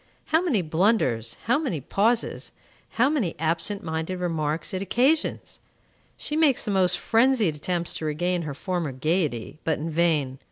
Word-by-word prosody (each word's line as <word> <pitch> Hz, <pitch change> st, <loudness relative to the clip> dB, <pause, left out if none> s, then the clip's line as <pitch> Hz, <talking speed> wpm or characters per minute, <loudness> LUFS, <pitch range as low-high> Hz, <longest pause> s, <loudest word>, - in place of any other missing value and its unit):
How 320 Hz, -, +5 dB
many 270 Hz, -, +1 dB
blunders, 155 Hz, -, +1 dB
how 245 Hz, +5 st, +2 dB
many 255 Hz, -, -2 dB
pauses, 220 Hz, -, 0 dB, 0.4 s
how 240 Hz, +3 st, +5 dB
many 270 Hz, -, 0 dB
absent 170 Hz, +6 st, -1 dB
minded 160 Hz, +3 st, -3 dB
remarks 160 Hz, -2 st, -2 dB
it 185 Hz, -, -2 dB
occasions! 260 Hz, +10 st, 0 dB, 0.6 s
She 300 Hz, -, -3 dB
makes 305 Hz, -7 st, +3 dB
the 210 Hz, -, -1 dB
most 185 Hz, -2 st, +3 dB
frenzied 230 Hz, -, +2 dB
attempts 170 Hz, +3 st, -2 dB
to 160 Hz, -, -5 dB
regain 175 Hz, +4 st, 0 dB
her 150 Hz, -4 st, -5 dB
former 175 Hz, -3 st, -3 dB
gayety, 155 Hz, -2 st, -1 dB
but 160 Hz, -, 0 dB
in 160 Hz, +2 st, -4 dB
vain. 155 Hz, -5 st, +1 dB
175 Hz, 155 wpm, -25 LUFS, 155-225 Hz, 0.6 s, How